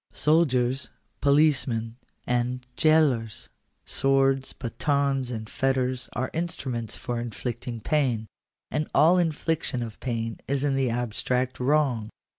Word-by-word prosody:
Soldiers, 135 Hz, -5 st, +2 dB, 0.3 s
policemen, 130 Hz, -6 st, +2 dB, 0.3 s
and 125 Hz, +1 st, -1 dB
gaolers; 145 Hz, -9 st, +2 dB, 0.4 s
swords, 135 Hz, 0 st, +2 dB
batons, 135 Hz, +1 st, -1 dB
and 110 Hz, -3 st, -5 dB
fetters, 130 Hz, 0 st, 0 dB
are 130 Hz, +3 st, -2 dB
instru 165 Hz, -5 st, -3 dB
ments 115 Hz, -2 st, -3 dB
for 120 Hz, -1 st, -3 dB
inflicting 120 Hz, 0 st, -5 dB
pain; 125 Hz, -5 st, +1 dB, 0.5 s
and 150 Hz, 0 st, -1 dB
all 175 Hz, +4 st, +6 dB
infliction 160 Hz, -6 st, 0 dB
of 110 Hz, -2 st, -8 dB
pain 115 Hz, -2 st, -3 dB
is 140 Hz, 0 st, 0 dB
in 140 Hz, -2 st, +1 dB
the 135 Hz, -2 st, +1 dB
abstract 125 Hz, +2 st, -1 dB
wrong. 130 Hz, -5 st, +1 dB
130 Hz, 115 wpm, -26 LUFS, 120-145 Hz, 0.5 s, all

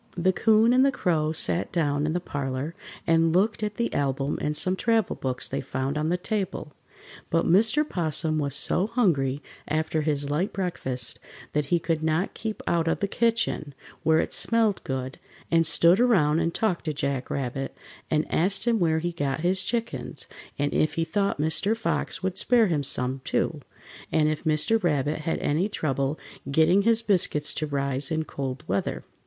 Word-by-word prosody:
The 185 Hz, +2 st, +2 dB
'Coon 225 Hz, +4 st, +4 dB
and 255 Hz, +1 st, +5 dB
the 275 Hz, -, +4 dB
Crow 160 Hz, -, 0 dB
sat 160 Hz, +2 st, 0 dB
down 150 Hz, -3 st, 0 dB
in 155 Hz, -, -1 dB
the 175 Hz, -, 0 dB
parlor, 140 Hz, -2 st, -4 dB, 0.3 s
and 165 Hz, 0 st, +3 dB
looked 210 Hz, +4 st, +2 dB
at 210 Hz, -1 st, -2 dB
the 235 Hz, +1 st, -2 dB
album 135 Hz, 0 st, -1 dB
and 150 Hz, 0 st, -1 dB
some 185 Hz, +4 st, +2 dB
travel 225 Hz, 0 st, +1 dB
books 130 Hz, -1 st, -2 dB
they -, -, -3 dB
found 130 Hz, +2 st, -3 dB
on 155 Hz, +1 st, 0 dB
the 180 Hz, -, +1 dB
table, 190 Hz, -6 st, -3 dB, 0.6 s
but 165 Hz, 0 st, +1 dB
Mr. 220 Hz, -, +4 dB
'Possum 155 Hz, -, 0 dB
was 140 Hz, -2 st, -1 dB
so 190 Hz, -, +1 dB
hungry 150 Hz, -, +1 dB, 0.2 s
after 155 Hz, +1 st, 0 dB
his 145 Hz, -2 st, 0 dB
light 155 Hz, +8 st, -1 dB
breakfast 130 Hz, -10 st, -2 dB, 0.3 s
that 150 Hz, 0 st, +1 dB
he 170 Hz, +5 st, +2 dB
could 165 Hz, -1 st, -1 dB
not 160 Hz, +4 st, 0 dB
keep 220 Hz, -1 st, -5 dB
out 170 Hz, -1 st, +1 dB
of 165 Hz, -, +1 dB
the 200 Hz, -, 0 dB
kitchen, 225 Hz, -, 0 dB, 0.3 s
where 160 Hz, 0 st, +3 dB
it -, -, 0 dB
smelled 225 Hz, -3 st, +1 dB
good, 130 Hz, 0 st, -4 dB, 0.3 s
and 165 Hz, -1 st, +4 dB
stood 170 Hz, +4 st, +5 dB
around 170 Hz, -11 st, +3 dB
and 165 Hz, 0 st, -1 dB
talked 185 Hz, -7 st, 0 dB
to 155 Hz, -2 st, -2 dB
Jack 140 Hz, -2 st, -2 dB
Rabbit, 135 Hz, 0 st, -3 dB, 0.3 s
and 155 Hz, -1 st, +1 dB
asked 190 Hz, +6 st, +1 dB
him 230 Hz, -2 st, +3 dB
where 160 Hz, -3 st, +2 dB
he 175 Hz, +2 st, -1 dB
got 145 Hz, -3 st, -2 dB
his 185 Hz, +2 st, +2 dB
chickens, 230 Hz, +4 st, -3 dB, 0.3 s
and 145 Hz, 0 st, -1 dB
if 155 Hz, -, +1 dB
he 165 Hz, -, +1 dB
thought 200 Hz, +2 st, 0 dB
Mr. 175 Hz, +8 st, +1 dB
Fox 225 Hz, -, -2 dB
would 190 Hz, 0 st, 0 dB
spare 240 Hz, -2 st, +4 dB
him 165 Hz, -7 st, 0 dB
some, 130 Hz, 0 st, 0 dB
too, -, -, -1 dB, 0.5 s
and 155 Hz, -1 st, +3 dB
if 155 Hz, +2 st, -3 dB
Mr. 155 Hz, +9 st, +2 dB
Rabbit 150 Hz, -2 st, 0 dB
had 160 Hz, +1 st, -2 dB
any 165 Hz, +8 st, 0 dB
trouble 140 Hz, -5 st, -1 dB, 0.3 s
getting 160 Hz, +7 st, +4 dB
his 230 Hz, +2 st, +3 dB
biscuits 175 Hz, -8 st, +1 dB
to 155 Hz, -, -3 dB
rise 140 Hz, -1 st, 0 dB
in 160 Hz, -1 st, -1 dB
cold 135 Hz, -3 st, -5 dB
weather. 100 Hz, +2 st, -2 dB
160 Hz, 180 wpm, -26 LUFS, 145-195 Hz, 0.6 s, and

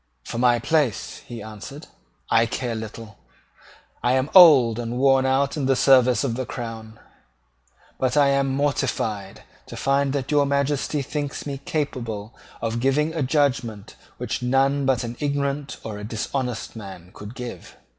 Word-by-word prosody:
"For 115 Hz, -, -5 dB
my 120 Hz, -1 st, +4 dB
place," 145 Hz, -2 st, 0 dB
he 115 Hz, -3 st, -7 dB
answered, 110 Hz, +7 st, -9 dB, 0.5 s
"I 115 Hz, +1 st, +4 dB
care 120 Hz, 0 st, -3 dB
little. 110 Hz, -1 st, -8 dB, 0.8 s
I 125 Hz, -, +2 dB
am 130 Hz, +2 st, 0 dB
old 135 Hz, -, +8 dB
and 120 Hz, +1 st, -4 dB
worn 135 Hz, 0 st, +4 dB
out 135 Hz, +2 st, +1 dB
in 135 Hz, -3 st, -1 dB
the 135 Hz, -, +3 dB
service 130 Hz, -1 st, +4 dB
of 130 Hz, -4 st, -1 dB
the 130 Hz, +3 st, -3 dB
crown; 115 Hz, -3 st, -7 dB, 1.0 s
but 130 Hz, +2 st, 0 dB
I 140 Hz, -1 st, +5 dB
am 140 Hz, 0 st, +2 dB
mortified 130 Hz, -8 st, -2 dB, 0.2 s
to -, -, -9 dB
find 140 Hz, 0 st, +1 dB
that 140 Hz, 0 st, -3 dB
your 145 Hz, -1 st, +3 dB
Majesty 140 Hz, +1 st, 0 dB
thinks 145 Hz, 0 st, -4 dB
me 140 Hz, -2 st, -4 dB
capable 115 Hz, -8 st, -3 dB, 0.3 s
of 115 Hz, +1 st, -1 dB
giving 145 Hz, +5 st, +1 dB
a 165 Hz, -, -2 dB
judgment 125 Hz, -7 st, 0 dB, 0.2 s
which -, -, -3 dB
none 135 Hz, +2 st, +2 dB
but 130 Hz, -3 st, +2 dB
an 120 Hz, 0 st, -6 dB
ignorant 140 Hz, 0 st, -2 dB
or 105 Hz, -2 st, -6 dB
a -, -, -8 dB
dishonest 120 Hz, +3 st, -4 dB
man 95 Hz, -5 st, -10 dB
could 105 Hz, +3 st, -10 dB
give." 125 Hz, -2 st, -8 dB
130 Hz, 155 wpm, -23 LUFS, 115-140 Hz, 1.0 s, old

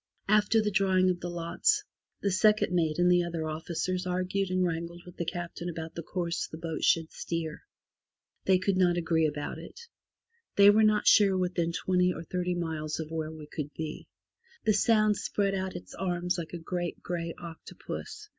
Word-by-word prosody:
After 210 Hz, +2 st, +4 dB
the 210 Hz, -, 0 dB
drawing 190 Hz, -2 st, +3 dB
of 175 Hz, -, -4 dB
the 175 Hz, -, -4 dB
lots, 175 Hz, -, +1 dB, 0.4 s
the 200 Hz, -, +2 dB
second 210 Hz, 0 st, +3 dB
mate 160 Hz, -3 st, +1 dB
and 180 Hz, 0 st, +4 dB
the 175 Hz, 0 st, +5 dB
other 170 Hz, -2 st, -3 dB
officers 175 Hz, +4 st, -2 dB
argued 185 Hz, +2 st, -1 dB
and 185 Hz, 0 st, +2 dB
wrangled 170 Hz, 0 st, -4 dB
with 180 Hz, 0 st, -12 dB
the 170 Hz, -, -2 dB
Captain 175 Hz, 0 st, -4 dB
about 165 Hz, -1 st, -6 dB
the 170 Hz, -, -5 dB
course 170 Hz, 0 st, -2 dB
the 160 Hz, -, -9 dB
boat 160 Hz, -1 st, -4 dB
should 165 Hz, -1 st, +3 dB
steer. 165 Hz, -2 st, -4 dB, 0.8 s
They 190 Hz, -1 st, +5 dB
could 185 Hz, +1 st, 0 dB
not 175 Hz, -2 st, +3 dB
agree 165 Hz, -2 st, +2 dB
about 145 Hz, -1 st, -4 dB
it. -, -, -11 dB, 0.8 s
They 200 Hz, 0 st, +8 dB
were 215 Hz, +2 st, +4 dB
not 215 Hz, -1 st, +3 dB
sure 195 Hz, -3 st, +6 dB
within 175 Hz, -2 st, 0 dB
twenty 180 Hz, +1 st, +2 dB
or 165 Hz, -, -6 dB
thirty 180 Hz, +1 st, -2 dB
miles 160 Hz, -3 st, -3 dB
of 160 Hz, 0 st, -5 dB
where 160 Hz, -1 st, -3 dB
we 155 Hz, -1 st, -9 dB
could 150 Hz, -1 st, -5 dB
be. 160 Hz, -1 st, -5 dB, 0.6 s
The 215 Hz, -, +4 dB
Sound 215 Hz, 0 st, +3 dB
spread 200 Hz, -1 st, 0 dB
out 190 Hz, -1 st, -2 dB
its 175 Hz, -, -8 dB
arms 180 Hz, -1 st, -1 dB
like 165 Hz, 0 st, -6 dB
a -, -, -3 dB
great 175 Hz, +1 st, -4 dB
grey 170 Hz, -1 st, -3 dB
octopus. 175 Hz, -, -8 dB
175 Hz, 185 wpm, -29 LUFS, 165-190 Hz, 0.8 s, They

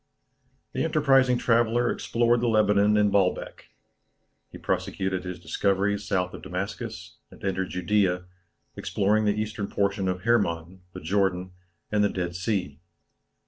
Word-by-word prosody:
The -, -, -1 dB
enterprising 135 Hz, -5 st, +3 dB
traveller 120 Hz, 0 st, +2 dB
explored 120 Hz, 0 st, +1 dB
the 120 Hz, -, +1 dB
Lebanon 105 Hz, -1 st, +3 dB
and 105 Hz, -1 st, +3 dB
Baalbek. 95 Hz, -2 st, 0 dB, 0.9 s
He -, -, -9 dB
prosecuted 95 Hz, 0 st, -2 dB
his 90 Hz, -1 st, -6 dB
discoveries 100 Hz, +3 st, 0 dB
south 90 Hz, -2 st, 0 dB
of -, -, -8 dB
Damascus, 95 Hz, -1 st, -6 dB
and -, -, -17 dB
entered 95 Hz, -1 st, -1 dB
Judea, 90 Hz, -1 st, +1 dB, 0.5 s
exploring 105 Hz, +2 st, +1 dB
the 105 Hz, 0 st, +1 dB
eastern 110 Hz, -1 st, -3 dB
portion 100 Hz, -1 st, 0 dB
of 90 Hz, 0 st, -2 dB
Hermon, 95 Hz, -5 st, 0 dB
the -, -, -8 dB
Jordan, 95 Hz, +1 st, 0 dB, 0.4 s
and 105 Hz, -1 st, +2 dB
the 105 Hz, -, +3 dB
Dead 90 Hz, -2 st, -3 dB
Sea. 90 Hz, -6 st, -2 dB
100 Hz, 135 wpm, -26 LUFS, 90-110 Hz, 0.9 s, enterprising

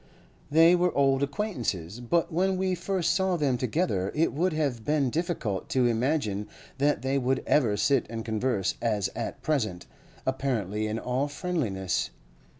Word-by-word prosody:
They 165 Hz, +3 st, +6 dB
were 180 Hz, 0 st, +2 dB
old 135 Hz, -1 st, +3 dB
acquaintances; 120 Hz, -, -2 dB
but 160 Hz, +8 st, 0 dB
when 190 Hz, +3 st, +2 dB
we 185 Hz, 0 st, 0 dB
first 180 Hz, 0 st, 0 dB
saw 190 Hz, -1 st, +1 dB
them 140 Hz, -5 st, +1 dB
together 120 Hz, -, 0 dB
it 160 Hz, +2 st, +2 dB
would 175 Hz, +6 st, +1 dB
have 140 Hz, -7 st, -1 dB
been 145 Hz, -3 st, +1 dB
difficult 150 Hz, -, -2 dB
to 130 Hz, -2 st, +2 dB
imagine 115 Hz, -4 st, 0 dB, 0.3 s
that 145 Hz, 0 st, +2 dB
they 135 Hz, +1 st, +1 dB
would 130 Hz, +1 st, 0 dB
ever 115 Hz, -9 st, +3 dB
sit 135 Hz, +2 st, +2 dB
and 115 Hz, -1 st, -5 dB
converse 110 Hz, -3 st, 0 dB
as 105 Hz, -4 st, 0 dB
at -, -, -5 dB
present, 110 Hz, -, -1 dB, 0.4 s
apparently 110 Hz, -6 st, -1 dB
in 110 Hz, +1 st, -2 dB
all 125 Hz, +4 st, -1 dB
friendliness. 135 Hz, -, -2 dB
135 Hz, 150 wpm, -27 LUFS, 110-160 Hz, 0.4 s, They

